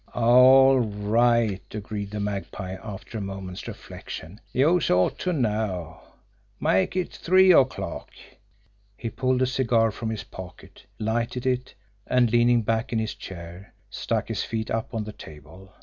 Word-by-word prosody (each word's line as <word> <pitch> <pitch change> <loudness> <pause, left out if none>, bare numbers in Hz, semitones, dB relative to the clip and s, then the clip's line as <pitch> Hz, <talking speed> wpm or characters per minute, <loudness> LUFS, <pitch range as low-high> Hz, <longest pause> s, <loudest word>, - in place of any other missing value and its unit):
"All 130 +3 +6
right," 110 -1 +1
agreed 105 -1 -5
the 105 +1 -5
Magpie, 100 -2 -4
after 110 +1 -7
a - - -5
moment's 95 -2 -6
reflection. 90 +8 -9
"Youse 160 +6 +2
ought 90 0 +2
to 185 - -1
know. 105 - -2 0.6
Make 95 - +1
it 185 -2 -1
three 185 +2 +5
o'clock." 130 -4 +1 0.9
He 115 - -5
pulled 130 0 +1
a - - +4
cigar 120 -4 +2
from 110 +2 -5
his 110 -1 -4
pocket, 95 -1 -12
lighted 115 +3 -2
it, 125 -2 -1 0.3
and, 125 -3 +3
leaning 120 0 +4
back 110 +1 -1
in 115 - 0
his 110 0 -2
chair, 90 +1 -10 0.2
stuck - - -2
his - - -2
feet 110 -1 -4
up 115 +1 -3
on 110 - -1
the 105 0 -8
table. 80 +5 -13
110 Hz, 150 wpm, -25 LUFS, 100-125 Hz, 0.9 s, All